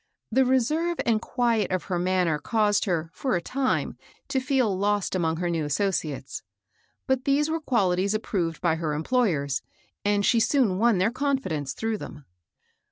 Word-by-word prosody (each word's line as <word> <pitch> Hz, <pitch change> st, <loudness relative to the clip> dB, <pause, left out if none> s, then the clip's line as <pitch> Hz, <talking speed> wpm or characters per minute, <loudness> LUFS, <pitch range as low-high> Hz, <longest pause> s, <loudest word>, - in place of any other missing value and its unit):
The 260 Hz, +3 st, +4 dB
reserve 305 Hz, +7 st, +1 dB
and 225 Hz, -2 st, +2 dB
quiet 230 Hz, -6 st, 0 dB
of 185 Hz, -1 st, -1 dB
her 180 Hz, -2 st, -2 dB
man 185 Hz, 0 st, +1 dB
ner 155 Hz, -3 st, 0 dB
caused 210 Hz, +2 st, +1 dB
her, 165 Hz, -4 st, -1 dB
for 260 Hz, -7 st, -1 dB
a -, -, +1 dB
time, 260 Hz, +8 st, -1 dB, 0.3 s
to 265 Hz, -, +1 dB
feel 260 Hz, -6 st, +1 dB
lost 205 Hz, +1 st, 0 dB
among 165 Hz, -3 st, 0 dB
her 175 Hz, +1 st, -1 dB
new 165 Hz, -2 st, -1 dB
associates; 150 Hz, -3 st, -2 dB, 0.6 s
but 265 Hz, -1 st, 0 dB
these 295 Hz, +3 st, +2 dB
were 325 Hz, 0 st, -1 dB
quaUties 200 Hz, -7 st, +1 dB
approved 175 Hz, -7 st, -2 dB
by 165 Hz, -3 st, +1 dB
her 155 Hz, -2 st, -2 dB
employers, 155 Hz, -, 0 dB, 0.4 s
and 205 Hz, 0 st, +2 dB
she 235 Hz, -, +4 dB
soon 225 Hz, -6 st, +2 dB
won 230 Hz, -2 st, +4 dB
their 190 Hz, +5 st, +2 dB
confi 275 Hz, -3 st, -1 dB
dence 145 Hz, -4 st, -3 dB
through 225 Hz, -1 st, -2 dB
them. 145 Hz, -2 st, -9 dB
205 Hz, 170 wpm, -26 LUFS, 170-250 Hz, 0.6 s, The